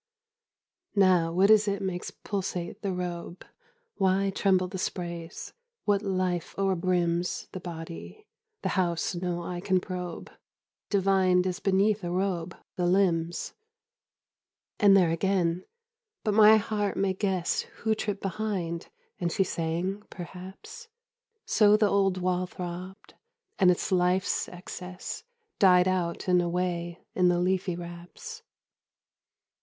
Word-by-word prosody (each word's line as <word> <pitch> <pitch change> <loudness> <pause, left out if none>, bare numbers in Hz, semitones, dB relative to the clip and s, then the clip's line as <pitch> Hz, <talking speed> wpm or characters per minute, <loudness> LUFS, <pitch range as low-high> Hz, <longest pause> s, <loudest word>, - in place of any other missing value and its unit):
Now, 185 -4 +4
what 190 +5 +4
is 215 -1 +6
it 200 -1 0
makes 185 -2 -3
pulsate 185 -4 -4
the 200 - -1
robe? 180 -1 -5 0.5
Why 195 0 +2
tremble 190 -2 +2
the 190 +1 -6
sprays? 170 -2 -5 0.3
What 205 -2 +3
life 185 -4 -1
o'erbrims 180 -2 +1
10 - - -25
The 185 - -6
body, 170 - -8 0.4
the - - 0
house 175 -1 0
no 175 -1 -2
eye 175 0 -4
can 185 -1 +2
probe, 180 -2 -6 0.6
Divined, 190 -2 +3
as 185 0 -2
beneath 200 +1 +2
a 175 - -2
robe, 180 -1 -1 0.2
the 175 -1 +1
limbs? 175 -3 +1 1.3
And 200 -2 +7
there 175 -4 +4
again! 180 0 +1 0.6
But 215 - +1
my 215 +1 +8
heart 210 -1 -1
may 195 -1 +1
guess 190 -3 0 0.2
Who 220 0 +3
tripped 205 -2 -3
behind; 190 -4 -3 0.3
and 175 -1 -1
she 195 - +2
sang, 175 +4 -2
perhaps: 185 - -9 0.6
So 210 -1 +5
the 215 -1 +4
old 195 -2 +2
wall 180 0 0
throbbed, 180 +2 -7 0.5
and 185 -3 +6
its 180 - +1
life's 180 0 +2
excess 180 - -7 0.4
Died 180 -2 +6
out 180 -2 -1
and 180 -1 +4
away 175 0 -2
in 180 -1 +3
the 175 0 +3
leafy 185 0 0
wraps. 175 - -9
185 Hz, 130 wpm, -28 LUFS, 175-195 Hz, 1.3 s, my